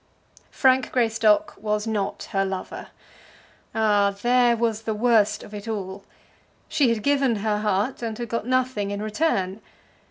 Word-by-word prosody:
Frank 260 -1 +2
Greystock 225 +4 +2
was 210 0 -1
not 210 -3 -3
her 195 0 +1
lover. 190 -1 -5 0.9
Ah, 205 -2 +2
there 245 -1 +4
was 225 -1 0
the 220 -1 -3
worst 215 -2 +2
of 205 - -12
it 205 +1 -7
all! 195 -3 -5 0.6
She 290 -5 +2
had 225 -2 -1
given 275 -4 +2
her 210 0 -1
heart 210 +5 -1
and 225 -2 -4
had 240 - -4
got 230 0 -3
nothing 255 -5 0
in 200 +1 -4
return. 215 - -1
220 Hz, 150 wpm, -24 LUFS, 205-240 Hz, 0.9 s, there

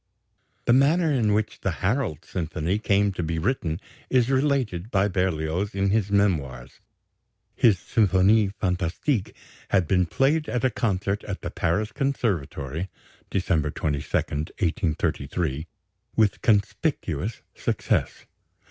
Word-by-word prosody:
The 120 - +4
manner 155 +5 +4
in 115 -6 +2
which 105 +1 0
the 95 - 0
"Harold" 105 - 0
symphony 85 +3 -2
came 100 -1 +2
to 90 - -4
be 80 0 -2
written 85 -4 -1 0.3
is 130 0 +3
related 130 -9 +1
by 100 -3 +2
Berlioz 90 0 -1
in 100 0 +1
his 105 -2 +1
Memoirs. 75 -12 0 0.7
His 110 -5 +4
Symphonie 100 +2 +3
fantastique 95 - -1 0.3
had 95 -4 +2
been 90 -1 +2
played 145 - +1
at 125 0 0
a 130 - +3
concert 100 -2 -1
at 100 - -5
the - - -4
Paris 100 +7 0
Conservatory 95 - -2 0.4
(December 85 -6 +1
22, 75 -2 -1
1833), 80 -1 -2 0.5
with 110 -3 +2
conspicuous 105 - 0
success. - - -1
100 Hz, 120 wpm, -25 LUFS, 85-110 Hz, 0.7 s, The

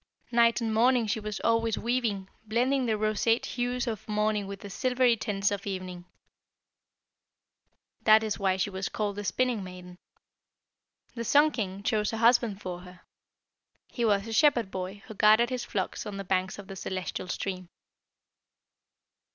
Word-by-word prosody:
Night 235 0 +4
and 225 -1 -1
morning 240 +1 +4
she 215 +1 -1
was 210 -1 -5
always 230 -1 +1
weaving, 230 -5 -1 0.2
blending 250 +4 +1
the 220 -1 +1
roseate 215 +2 +1
hues 245 0 -2
of 220 -3 -5
morning 210 -1 0
with 195 0 -7
the 200 - -8
silvery 250 +2 +2
tints 205 -3 -1
of 200 0 -4
evening. 185 -2 -5 2.0
That 220 0 +6
is 215 -2 -2
why 190 -1 +1
she 195 +2 -1
was 190 0 -3
called 205 -2 -2
the 205 - -4
Spinning 245 0 0
maiden. 180 -1 -10 1.1
The 235 - -4
Sun 290 +6 +4
king 200 -6 -4
chose 210 -2 +1
a 225 - -3
husband 230 -3 +3
for 180 -1 -5
her. 180 0 -14 0.9
He 240 - -3
was 205 -3 +2
a 225 - -5
Shepherd 240 -7 +3
boy 190 +2 -5
who - - -9
guarded 215 +4 +4
his 250 -1 -3
flocks 190 +1 -3
on 205 -1 -6
the 195 - -4
banks 185 0 -1
of 205 - -9
the 195 - -9
celestial 185 -1 -4
stream. 185 -1 -4
210 Hz, 160 wpm, -28 LUFS, 195-235 Hz, 2.0 s, That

